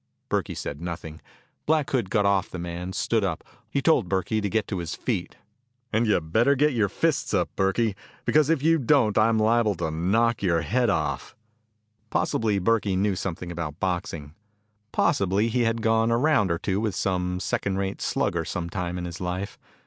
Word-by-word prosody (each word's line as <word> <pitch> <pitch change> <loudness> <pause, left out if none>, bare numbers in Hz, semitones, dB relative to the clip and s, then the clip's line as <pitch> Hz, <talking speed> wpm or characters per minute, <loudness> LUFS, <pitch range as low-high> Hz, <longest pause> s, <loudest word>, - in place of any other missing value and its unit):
Burkey - - -1
said 70 +2 -5
nothing. 80 -2 -6 0.5
Black 155 -2 +2
Hood 120 -8 0
got 105 -1 +2
off 100 -1 +2
the - - -6
man, 85 +1 -5
stood 115 +1 0
up. 90 -3 -2 0.3
He 140 +3 -1
told 130 - +3
Burkey 95 +4 0
to 100 - -1
get 110 +1 0
to 95 - -2
his 85 -1 -4
feet. 105 -8 -3 0.6
"And 110 +2 +2
you'd 80 -6 0
better 120 +6 +4
get 150 +2 +3
your 105 -5 +1
fists - - 0
up, - - -1
Burkey, 95 +2 +1 0.3
because 150 -1 +3
if 160 -4 +2
you 165 +1 +4
don't 125 -5 +3
I'm 110 +1 +4
liable 110 -1 +3
to 80 -1 -2
knock 105 +9 +1
your 85 -4 +2
head 115 +9 +1
off." 75 -7 -2 0.7
Possibly 110 -2 +1
Burkey 100 0 +1
knew 100 +1 +1
something 90 -1 -4
about 80 -3 -5
boxing. 85 -5 -3 0.6
Possibly 100 - +2
he 120 +1 +1
had 115 0 0
gone 115 0 +3
a 115 - +3
round 130 -7 +3
or 85 - +1
two 95 +3 -1
with 110 -4 -1
some 90 -1 -1
second 95 +1 -1
rate 95 0 -3
slugger 85 -1 0
some 85 +1 -4
time 90 -1 -3
in 90 - -4
his 85 +1 -7
life. 90 +3 -4
100 Hz, 185 wpm, -25 LUFS, 90-115 Hz, 0.7 s, better